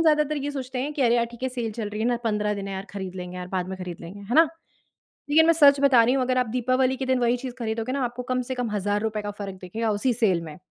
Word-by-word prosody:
ज़्यादातर 305 -1 +3
ये 285 0 -2
सोचते 260 -2 -5
हैं 295 +2 -3
कि 280 - 0
अरे! 235 -1 +4
यार 235 - +3
ठीक 235 +1 -14
है 260 - +1
सेल 240 -3 -3
चल 210 -1 -4
रही 210 +1 -5
है 225 - +1
ना 245 - +2
15 210 -1 0
दिन 200 -1 -5
है 195 - -4
यार, 190 +1 -5
खरीद 190 -2 -6
लेंगे 180 0 -6
यार, 180 0 -5
बाद 185 -1 -2
में 190 - -5
खरीद 180 -2 -7
लेंगे 175 +4 -9
है 200 +4 -4
ना? 325 0 +7 0.8
लेकिन 320 +2 +6
मैं 335 - +6
सच 285 -3 +6
बता 265 -4 +6
रही 245 +3 +3
हूँ 270 - +1
अगर 255 0 0
आप 250 -2 +2
दीपावली 255 +1 +1
के 265 - -3
दिन 260 -1 +2
वही 240 0 +2
चीज़ 250 0 -6
खरीदोगे 225 +1 -2
ना 275 -1 -1
आपको 245 +1 -3
कम 255 0 +1
से 260 - -1
कम 245 -2 -2
हजार 205 0 0
रुपए 215 -1 -2
का 205 0 -4
फ़र्क 195 -1 -5
दिखेगा 220 +5 -2
उसी 235 +5 +1
सेल 195 -7 +2
में। 155 -2 -9
235 Hz, 305 wpm, -25 LUFS, 205-260 Hz, 0.8 s, ना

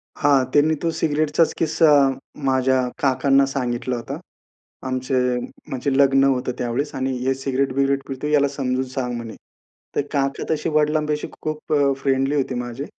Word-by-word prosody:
हां. 140 -2 +3
त्यांनी 155 +2 +4
तो 165 - +2
सिगारेटचाच 155 +1 +1
किस्सा 160 0 +2 0.6
माझ्या 130 0 +2 0.2
काकांना 135 0 +3
सांगितला 125 -2 -2
होता. 115 -1 -6 0.7
आमचे 130 +1 -2 0.5
म्हणजे 135 +2 -2
लग्न 135 -1 +5
होतं 130 -2 +1
त्यावेळेस 125 +5 -2
आणि 130 0 -1
"हे 130 +2 0
सिगारेट-बिगारेट 135 +1 0
पितो 135 +1 -5
आहे 150 - -1
याला 140 -1 +4
समजून 130 -2 -2
सांग 125 -2 -2
म्हणे." 115 -2 -7 0.6
तर - - +2
काका 140 -1 -1
तशी 160 +1 0
वडिलांपाशी 150 0 +1
खूप 155 0 -4
अ, 140 -2 +3
फ्रेंडली 135 +1 +1
होती 135 -2 -1
माझे. 120 +3 -4
135 Hz, 150 wpm, -22 LUFS, 130-145 Hz, 0.7 s, लग्न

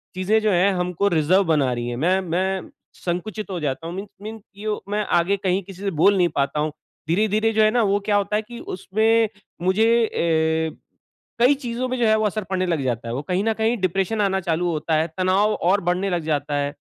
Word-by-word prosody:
चीज़ें 190 +4 +2
जो 215 -1 +2
है 185 +2 +3
हमको 180 +2 0
रिज़र्व 175 +2 +3
बना 150 -6 +2
रही 120 0 -3
है, 120 - -3
मैं 175 +9 +2
मैं 185 +2 -2 0.3
संकुचित 190 +4 -4
हो 180 - -3
जाता 150 +2 -3
हूँ 170 - -6
मीन्स 195 +2 -6
मीन्स 220 +1 -7
कि 200 +2 -11
यो 215 -1 -2
मैं 210 +1 0 0.2
आगे 195 +4 +1
कहीं 190 0 0
किसी 190 0 -12
से 200 -1 -1
बोल 200 +3 +6
नहीं 180 -2 +4
पाता 140 +1 0
हूँ, 155 +1 0 0.4
धीरे-धीरे 215 +5 +2
जो 220 - +3
है 215 - +4
ना 240 +1 +2
वो 200 0 +2
क्या 210 - +2
होता 205 +1 -1
है 215 - +1
कि 235 +2 -10
उसमें 220 +4 +1 0.3
मुझे 225 +5 +3
अ, 160 -3 0 0.6
कई 250 +4 +6
चीज़ों 250 -1 -3
में 255 - -2
जो 235 - +2
है 215 - +5
वो 215 - 0
असर 210 +1 -1
पड़ने 185 -1 0
लग 165 -5 0
जाता 120 -2 -2
है, 115 - -3
वो 130 - -2
कहीं 180 +5 -1
न 225 0 +1
कहीं 225 +2 +1
डिप्रेशन 195 +4 0
आना 190 -1 +1
चालू 175 0 0
होता 160 0 -2
है, 155 +1 +1
तनाव 190 +3 +2
और 190 +4 +1
बढ़ने 180 +3 0
लग 175 -3 -1
जाता 145 -2 -1
है, 145 0 -1
190 Hz, 230 wpm, -22 LUFS, 165-215 Hz, 0.6 s, बोल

